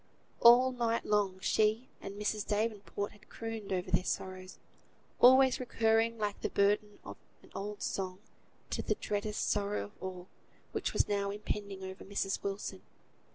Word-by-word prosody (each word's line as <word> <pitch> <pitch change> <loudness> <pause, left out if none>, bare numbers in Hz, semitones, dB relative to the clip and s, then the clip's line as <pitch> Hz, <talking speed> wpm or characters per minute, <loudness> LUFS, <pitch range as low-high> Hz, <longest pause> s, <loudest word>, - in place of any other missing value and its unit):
All 245 +2 +8
night 235 -2 0
long 200 -3 +1
she 220 +5 +2
and 200 +1 -7
Mrs. 210 0 -1
Davenport 205 -1 -2
had 205 - -20
crooned 225 -3 -6
over 185 -1 -2
their 180 0 +3
sorrows, 185 0 -4 0.6
always 260 +1 +7
recurring, 230 -2 +2
like 210 -2 -2
the - - -1
burden 205 +1 +1
of - - -8 0.3
an - - -18
old 205 +1 -5
song, 185 -1 -2 0.5
to - - -1
the - - 0
dreadest 210 +1 -2
sorrow 205 0 0
of 205 - -10
all, 185 -1 -6 0.4
which - - -2
was - - +2
now 200 -1 0
impending 200 -1 -4
over 190 0 -7
Mrs. 195 -1 -2
Wilson. 200 0 -4
205 Hz, 155 wpm, -32 LUFS, 195-225 Hz, 0.6 s, All